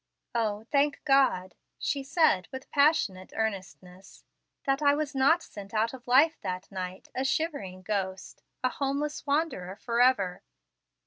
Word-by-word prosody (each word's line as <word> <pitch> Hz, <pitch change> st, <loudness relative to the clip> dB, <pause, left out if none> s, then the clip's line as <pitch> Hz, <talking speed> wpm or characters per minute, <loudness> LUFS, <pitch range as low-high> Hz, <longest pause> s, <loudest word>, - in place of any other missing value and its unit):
Oh, 220 Hz, -2 st, -1 dB
thank 285 Hz, 0 st, +2 dB
God," 265 Hz, -, +3 dB, 0.2 s
she 280 Hz, -, -1 dB
said 270 Hz, -, +2 dB
with 260 Hz, 0 st, -8 dB
passionate 280 Hz, -, +2 dB
earnestness, 190 Hz, -3 st, -5 dB, 0.4 s
"that 275 Hz, 0 st, +1 dB
I 285 Hz, -1 st, +4 dB
was 305 Hz, 0 st, -2 dB
not 280 Hz, +5 st, +3 dB
sent 200 Hz, +1 st, -10 dB
out 220 Hz, +3 st, +1 dB
of 250 Hz, -2 st, -11 dB
life 290 Hz, +6 st, +4 dB
that 185 Hz, +2 st, -5 dB
night, 185 Hz, -1 st, -6 dB
a 260 Hz, -, -1 dB
shivering 270 Hz, -, -2 dB
ghost, 190 Hz, -1 st, -3 dB, 0.2 s
a 255 Hz, -, +3 dB
homeless 285 Hz, +3 st, -3 dB
wanderer 280 Hz, -, -1 dB
forever! 230 Hz, -5 st, +2 dB
245 Hz, 135 wpm, -28 LUFS, 190-280 Hz, 0.4 s, I